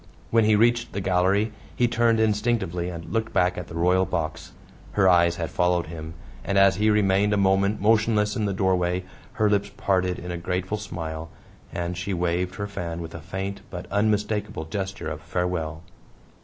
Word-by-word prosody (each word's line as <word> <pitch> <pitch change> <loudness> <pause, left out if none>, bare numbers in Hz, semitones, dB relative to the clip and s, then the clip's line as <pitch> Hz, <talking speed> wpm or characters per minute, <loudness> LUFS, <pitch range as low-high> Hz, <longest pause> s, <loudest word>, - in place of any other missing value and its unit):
When 115 -1 +4
he 110 0 +5
reached 120 +2 +2
the 100 - -2
gallery 95 +3 +2 0.2
he 120 - +3
turned 115 -1 +2
instinctively 105 -5 0
and 85 +1 -7
looked 115 0 -1
back 90 0 +2
at 90 -1 -6
the 80 - -9
royal 90 +2 +3
box. 85 -4 -3 0.4
Her 100 -2 +4
eyes 85 -1 +5
had 85 -2 -4
followed 90 +1 +1
him, 80 0 -8 0.3
and 100 - 0
as 95 -1 +5
he 105 +1 +3
remained 105 -1 +3
a - - +2
moment 100 +1 +2
motionless 105 0 +2
in 110 - 0
the 100 - 0
doorway 90 -1 +1 0.3
her 110 - +2
lips 100 -1 +1
parted 90 -2 +1
in 90 0 -6
a 90 - -3
grateful 90 +4 -2
smile, 80 -5 -6 0.4
and 85 0 -3
she 90 +2 -3
waved 90 +1 -1
her 100 - -3
fan 85 -4 -5
with 80 -1 -7
a 85 - -7
faint 95 +3 -5
but 90 -1 -6
unmistakable 105 -3 0
gesture 95 +4 -4
of 75 0 -5
farewell. 85 -1 -2
95 Hz, 185 wpm, -25 LUFS, 85-105 Hz, 0.4 s, he